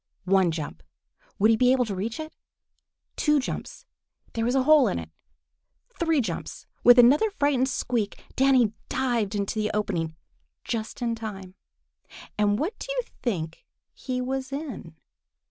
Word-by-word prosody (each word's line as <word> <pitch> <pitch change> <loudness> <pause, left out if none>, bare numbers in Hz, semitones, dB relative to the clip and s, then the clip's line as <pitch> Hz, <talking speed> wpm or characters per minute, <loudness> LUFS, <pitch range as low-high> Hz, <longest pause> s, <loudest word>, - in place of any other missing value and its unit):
One 190 -1 +4
jump! 150 - -5 0.6
Would 215 +3 +5
he - - +5
be 250 +2 +4
able 255 -1 +3
to 210 - -4
reach 220 - -3
it? 315 0 -7 0.8
Two 300 -1 +3
jumps! 280 - -6 0.5
There 225 - -1
was 245 +3 +1
a 265 - +3
hole 300 -2 +6
in - - -1
it! 80 -1 -7 0.9
Three 325 -4 +2
jumps! 180 -8 -5 0.2
With 245 +1 +8
another 275 - +6
frightened 285 -8 +1
squeak, 230 -6 -2 0.2
Danny 260 -5 +4 0.2
dived 240 -6 0
into 200 +2 -2
the 210 - 0
opening 170 -6 -1 0.5
just 225 +1 -4
in 235 -1 0
time. 200 -5 -7 0.8
And 205 -1 +2
what 330 - -3
do - - -7
you - - 0 0.2
think 165 -9 -3 0.3
he 255 -1 -4
was 265 +1 -3
in? 275 - -6
235 Hz, 150 wpm, -26 LUFS, 200-265 Hz, 0.9 s, With